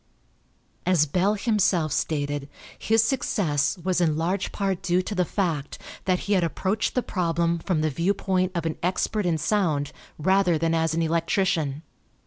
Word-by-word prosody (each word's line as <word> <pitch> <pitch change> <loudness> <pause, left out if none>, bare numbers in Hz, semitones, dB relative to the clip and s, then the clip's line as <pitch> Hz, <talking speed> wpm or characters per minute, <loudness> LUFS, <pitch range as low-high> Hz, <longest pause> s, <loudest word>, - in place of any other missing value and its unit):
As 180 -5 +3
Bell 185 +7 +1
himself 195 -7 +1
stated, 145 -2 -2 0.3
his 225 0 +3
success 185 - 0
was 180 +1 0
in 155 -3 +2
large 180 +4 -1
part 195 -3 -2
due 185 -1 +1
to 210 - -4
the 185 -2 +2
fact 165 -7 -2 0.3
that 185 -1 +1
he 205 - -1
had 185 -3 +3
approached 190 +5 -1
the 250 - +1
problem 170 -2 0
from 165 -2 -1
the 155 0 0
viewpoint 185 +3 0
of 170 -1 -2
an 160 -1 -3
expert 185 +3 0
in 165 -2 +1
sound 155 -6 0 0.3
rather 190 +1 +3
than 165 +1 0
as 160 -1 +1
an 165 - +1
electrician. 165 -2 0
175 Hz, 160 wpm, -25 LUFS, 160-195 Hz, 0.3 s, As